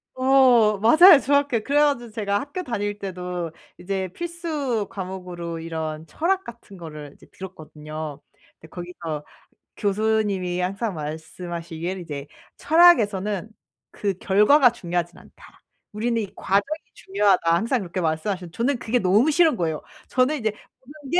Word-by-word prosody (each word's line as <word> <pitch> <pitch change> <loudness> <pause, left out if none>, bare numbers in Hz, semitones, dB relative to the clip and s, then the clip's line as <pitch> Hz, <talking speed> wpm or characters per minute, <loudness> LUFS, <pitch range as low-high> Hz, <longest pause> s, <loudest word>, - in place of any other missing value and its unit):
어 255 -5 +5
맞아요. 310 - +8
중학교 285 -3 +2
그래 285 +4 +2
가지고 240 -6 +1
제가 205 -2 -1
학교 285 - -5
다닐 205 - -3
때도 180 -3 -5 0.3
이제 190 0 -3
필수 310 - -3
과목으로 180 -4 -6
이런 160 -1 -5
철학 370 - -1
같은 235 -4 -12
거를 150 -4 -9
이제 - - -19
들었거든요. 155 -4 -8 0.4
근데 160 - -14
거기서 170 -4 -6 0.5
교수님이 200 -3 0
항상 195 +2 -2
말씀하시기를 165 +3 -6
"이제 145 -5 -6 0.3
철학에서는 220 - +4 0.4
그 200 -1 -2
결과가 230 +8 +5
중요하진 175 -6 -4
않다. - - -18 0.3
우리는 230 +2 -1
이 210 - -3
과정이 205 +12 0 0.2
중요하다." 190 -4 +2
항상 230 +7 +1
그렇게 185 0 -4
말씀하셨는데. 170 +2 -2
저는 245 +2 0
그게 235 +3 0
너무 215 +7 +3
싫은 320 -3 +4
거예요. 160 -3 -2 0.2
저는 260 +4 +1
이제 220 -2 0
보는 275 +6 -15
게 355 - +4
200 Hz, 330 characters per minute, -23 LUFS, 175-250 Hz, 0.5 s, 맞아요